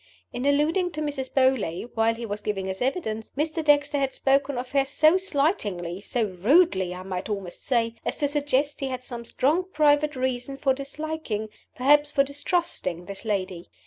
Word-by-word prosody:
In 250 +3 -2
alluding 315 +6 +2
to 305 - -3
Mrs. 280 -3 -3
Beauly, 255 -8 +1
while 225 0 +2
he 235 +1 -6
was 205 -1 -4
giving 200 -2 -2
his 190 0 -5
evidence, 245 -5 -2
Mr. 315 +2 -1
Dexter 290 -1 +3
had 270 -1 -1
spoken 275 0 +1
of 250 +1 -5
her 275 -1 +3
so 310 +4 +4
slightingly 275 - -1
so 235 +2 -1 0.2
rudely, 205 - +4
I 185 - -8
might 185 +1 -5
almost 195 -4 -4
say 230 -3 +1
as - - -2
to 290 - +1
suggest 290 0 0
he 275 - -2
had 255 -1 -4
some 240 -2 -6
strong 295 +9 +1
private 300 -1 +3
reasons 255 +1 -2
for 270 -1 +2
disliking 275 -5 -4 0.3
(perhaps 290 +3 +4
for 280 -2 +4
distrusting) 280 - -1
this 200 +3 -7
lady. 185 -4 -3
265 Hz, 175 wpm, -25 LUFS, 215-295 Hz, 0.3 s, so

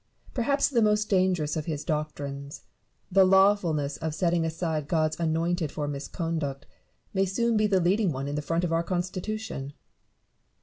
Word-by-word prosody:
Perhaps 275 +3 +2
the 245 -5 +2
most 210 0 +2
dangerous 185 -5 +2
of 155 0 -3
his 155 -3 -3
doctrines, 145 -3 -4 0.5
the 195 +1 +6
lawfulness 185 -7 +3
of 160 -2 -3
setting 170 -1 +1
aside 160 -2 -2
God's 155 -1 0
anointed 165 0 0
for 150 -1 -3
misconduct, 145 -1 -3 0.5
may 195 -1 +2
soon 230 +5 +1
be 215 0 +3
the 195 -2 +3
leading 185 +2 +2
one 135 0 -4
in 145 - -3
the 150 - -1
front 165 +3 -1
of 170 -2 0
our 165 - +2
Constitution. 185 -3 -4
170 Hz, 160 wpm, -27 LUFS, 150-195 Hz, 0.5 s, the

